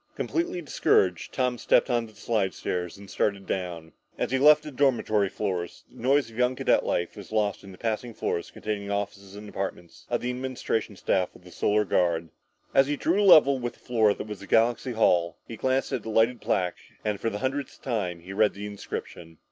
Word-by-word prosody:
Completely 335 Hz, -, -2 dB
discouraged, 90 Hz, -, +2 dB
Tom 125 Hz, -2 st, 0 dB
stepped -, -, +3 dB
on 120 Hz, -3 st, 0 dB
the 110 Hz, -, -17 dB
slidestairs 95 Hz, -4 st, -2 dB
and 100 Hz, 0 st, -12 dB
started 100 Hz, 0 st, -1 dB
down. 85 Hz, -3 st, -4 dB, 0.3 s
As -, -, -2 dB
he 130 Hz, -, +2 dB
left 150 Hz, +2 st, +7 dB
the 150 Hz, -, -7 dB
dormitory 120 Hz, -7 st, +2 dB
floors, 90 Hz, -5 st, -3 dB
the -, -, -13 dB
noise 135 Hz, -1 st, +2 dB
of 110 Hz, -, -14 dB
young 125 Hz, +1 st, +2 dB
cadet -, -, +2 dB
life 85 Hz, -, -1 dB
was 100 Hz, -3 st, -10 dB
soon 110 Hz, -, -1 dB
lost 105 Hz, -2 st, 0 dB
and 100 Hz, -, -11 dB
he 90 Hz, -, -13 dB
passed 110 Hz, +1 st, -1 dB
floors 85 Hz, -, -2 dB
containing 100 Hz, -2 st, -4 dB
offices 100 Hz, -1 st, -4 dB
and 105 Hz, +1 st, -9 dB
apartments 95 Hz, -4 st, -6 dB
of -, -, 0 dB
the 125 Hz, -, -1 dB
administration 125 Hz, -4 st, -2 dB
staff 95 Hz, -1 st, 0 dB
of -, -, -16 dB
the 90 Hz, -, -14 dB
Solar 105 Hz, +3 st, +1 dB
Guard. 85 Hz, -3 st, +1 dB, 0.4 s
As 135 Hz, 0 st, +5 dB
he 145 Hz, 0 st, -1 dB
drew 180 Hz, +8 st, +2 dB
level 145 Hz, -8 st, +7 dB
with 120 Hz, -1 st, -3 dB
the -, -, -24 dB
floor 110 Hz, -4 st, +2 dB
that -, -, -6 dB
was 105 Hz, -2 st, -8 dB
Galaxy 120 Hz, +4 st, +2 dB
Hall, 85 Hz, -7 st, +2 dB
he 115 Hz, -, -7 dB
glanced 130 Hz, +4 st, 0 dB
at 130 Hz, -, -1 dB
the 110 Hz, -, -7 dB
lighted 115 Hz, +1 st, +2 dB
plaque 90 Hz, -2 st, 0 dB, 0.3 s
and 105 Hz, -2 st, -1 dB
for 115 Hz, -, +1 dB
the 105 Hz, -, -4 dB
hundredth 135 Hz, +4 st, -3 dB
time 95 Hz, -9 st, -2 dB
reread 100 Hz, +3 st, +2 dB
the 100 Hz, +1 st, -6 dB
inscription 85 Hz, -5 st, -7 dB
105 Hz, 205 wpm, -27 LUFS, 95-125 Hz, 0.4 s, left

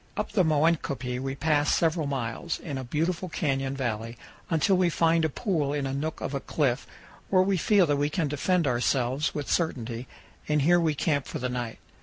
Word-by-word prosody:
Up -, -, -2 dB
the 190 Hz, -, +3 dB
Moenkopi 145 Hz, -6 st, +1 dB
we 135 Hz, +1 st, -3 dB
pass 145 Hz, 0 st, +2 dB
several 160 Hz, -2 st, +1 dB
miles, 135 Hz, +4 st, -3 dB
in 145 Hz, -6 st, -5 dB
a -, -, -4 dB
beautiful 165 Hz, +7 st, -1 dB
canyon 135 Hz, -4 st, -1 dB
valley, 115 Hz, -2 st, -3 dB, 0.3 s
until 165 Hz, +4 st, +3 dB
we 180 Hz, -1 st, +3 dB
find 165 Hz, 0 st, +2 dB
a 160 Hz, -, +2 dB
pool 155 Hz, -, -1 dB
in 145 Hz, -2 st, -1 dB
a 135 Hz, -, -2 dB
nook 155 Hz, +3 st, -3 dB
of -, -, -3 dB
a 140 Hz, -, -1 dB
cliff, 135 Hz, -3 st, -1 dB, 0.4 s
where 185 Hz, -1 st, +5 dB
we 195 Hz, +1 st, +1 dB
feel 195 Hz, +2 st, +4 dB
that 145 Hz, -2 st, +1 dB
we 145 Hz, +1 st, +1 dB
can 155 Hz, 0 st, 0 dB
defend 165 Hz, +4 st, +1 dB
ourselves 130 Hz, +2 st, 0 dB
with 145 Hz, -2 st, -3 dB
certainty, 125 Hz, -7 st, -1 dB, 0.4 s
and 150 Hz, -2 st, +2 dB
here 175 Hz, +3 st, +5 dB
we 160 Hz, -3 st, +1 dB
camp 145 Hz, -2 st, 0 dB
for -, -, -4 dB
the 125 Hz, -, -2 dB
night. 120 Hz, -2 st, -4 dB
145 Hz, 200 wpm, -27 LUFS, 135-165 Hz, 0.4 s, where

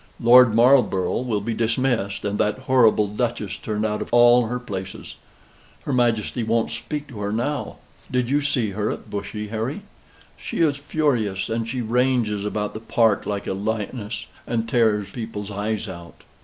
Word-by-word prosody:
"Lord 120 Hz, -1 st, +7 dB
Marlborough 120 Hz, -6 st, +4 dB
will 115 Hz, -5 st, -1 dB
be 115 Hz, +3 st, -2 dB
dismissed, 115 Hz, -3 st, 0 dB
and 105 Hz, 0 st, -2 dB
that 105 Hz, -, +1 dB
horrible 115 Hz, -5 st, +4 dB
duchess 110 Hz, -1 st, -2 dB
turned 105 Hz, 0 st, -2 dB
out 105 Hz, -1 st, -1 dB
of -, -, -6 dB
all 120 Hz, 0 st, +6 dB
her 125 Hz, +2 st, -2 dB
places. 95 Hz, -6 st, -7 dB, 0.7 s
Her 140 Hz, -, -2 dB
Majesty 120 Hz, -1 st, +1 dB
won't 115 Hz, 0 st, 0 dB
speak 150 Hz, -1 st, -5 dB
to 115 Hz, -6 st, -9 dB
her 100 Hz, 0 st, -2 dB
now. 120 Hz, +7 st, -2 dB, 0.3 s
Did 125 Hz, -1 st, 0 dB
you 145 Hz, +3 st, +2 dB
see 125 Hz, -7 st, 0 dB
her 105 Hz, +2 st, -1 dB
at -, -, -6 dB
Bushy, 105 Hz, +1 st, -5 dB
Harry? 115 Hz, -, -3 dB, 0.6 s
She -, -, -4 dB
is 150 Hz, -4 st, +3 dB
furious, 135 Hz, -11 st, -1 dB
and 115 Hz, 0 st, -2 dB
she 125 Hz, +1 st, -2 dB
ranges 120 Hz, -3 st, +1 dB
about 105 Hz, 0 st, -3 dB
the 110 Hz, -, -5 dB
park 115 Hz, -1 st, +1 dB
like 100 Hz, -1 st, -3 dB
a -, -, -2 dB
lioness, 105 Hz, +2 st, -4 dB, 0.2 s
and 115 Hz, -1 st, -1 dB
tears 110 Hz, -4 st, +1 dB
people's 110 Hz, -4 st, -6 dB
eyes 105 Hz, +2 st, -2 dB
out." 85 Hz, -2 st, -10 dB
115 Hz, 170 wpm, -23 LUFS, 105-125 Hz, 0.7 s, Lord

